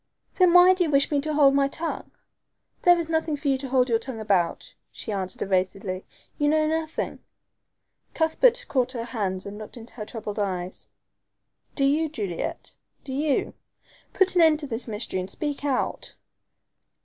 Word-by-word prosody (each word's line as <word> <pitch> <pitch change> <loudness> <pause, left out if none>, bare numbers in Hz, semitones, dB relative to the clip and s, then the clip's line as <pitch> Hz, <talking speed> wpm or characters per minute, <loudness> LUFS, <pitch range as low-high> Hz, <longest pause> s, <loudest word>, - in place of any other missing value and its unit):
"Then 365 -2 +4
why 360 +1 +8
do 365 -1 +1
you 330 - -1
wish 280 0 +2
me 285 -1 +2
to 310 +1 -2
hold 280 -2 +6
my 275 0 +3
tongue?" 325 +4 -4 0.7
"There 350 -1 +6
is 335 -2 -2
nothing 320 -2 0
for 285 0 -2
you 270 - +2
to 270 -1 -5
hold 255 -1 +3
your 230 -2 +2
tongue 235 -1 -6
about," 195 -6 0 0.2
she 220 - -6
answered 190 -2 -3
evasively. 190 0 -1 0.3
"You 290 - +2
know 310 0 +3
nothing." 320 0 -2 1.0
Cuthbert 480 +10 +3
caught 255 -1 0
her 235 -2 -3
hands 200 -6 -3
and 205 +1 -7
looked 215 +3 -9
into 230 0 -11
her 215 -3 -6
troubled 215 -3 -5
eyes. 185 -2 -3 0.9
"Do 275 - 0
you, 305 +3 +2
Juliet 200 - -4 0.3
do 265 - -6
you? 290 +1 0 0.6
Put 385 -1 +2
an 355 - +4
end 315 -2 +5
to - - -4
this 245 -2 -3
mystery 210 -3 -3
and 185 +1 -5
speak 290 +5 -3
out." 275 -3 -2
270 Hz, 175 wpm, -25 LUFS, 210-310 Hz, 1.0 s, why